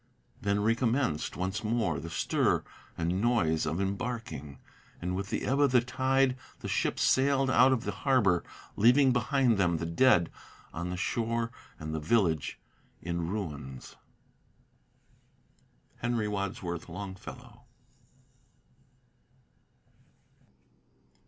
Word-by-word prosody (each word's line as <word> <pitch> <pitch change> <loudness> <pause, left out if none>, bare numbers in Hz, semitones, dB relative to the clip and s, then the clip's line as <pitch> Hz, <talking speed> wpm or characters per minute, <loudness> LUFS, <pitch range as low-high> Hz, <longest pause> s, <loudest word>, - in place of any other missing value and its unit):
Then 100 0 +1
recommenced 115 - 0
once 95 +4 -2
more 110 -8 0
the 85 +4 -7
stir - - +1 0.3
and 85 +3 0
noise 80 -10 +2
of 80 +4 -1
embarking; 100 - -4 0.4
And 90 +1 -2
with 100 +1 -4
the - - -2
ebb 135 +2 +1
of 145 -1 +5
the 125 - +7
tide 130 +2 +1 0.3
the - - -5
ships - - 0
sailed 135 0 +3
out 130 +2 +6
of 130 -3 +1
the 105 - -2
harbor, 100 -5 +2 0.3
Leaving 130 +5 +5
behind 125 -2 +2
them 85 -3 +2
the 80 - -3
dead 85 0 +4 0.4
on 85 +2 -4
the 90 - -3
shore, 115 +4 -1 0.3
and 80 0 -5
the 80 - -1
village 80 -2 +1 0.4
in 85 -1 -2
ruins. 75 -10 -6 2.0
HENRY 120 -3 -1
WADSWORTH 95 -4 -4
LONGFELLOW. 95 +2 -9
100 Hz, 115 wpm, -30 LUFS, 85-120 Hz, 2.0 s, the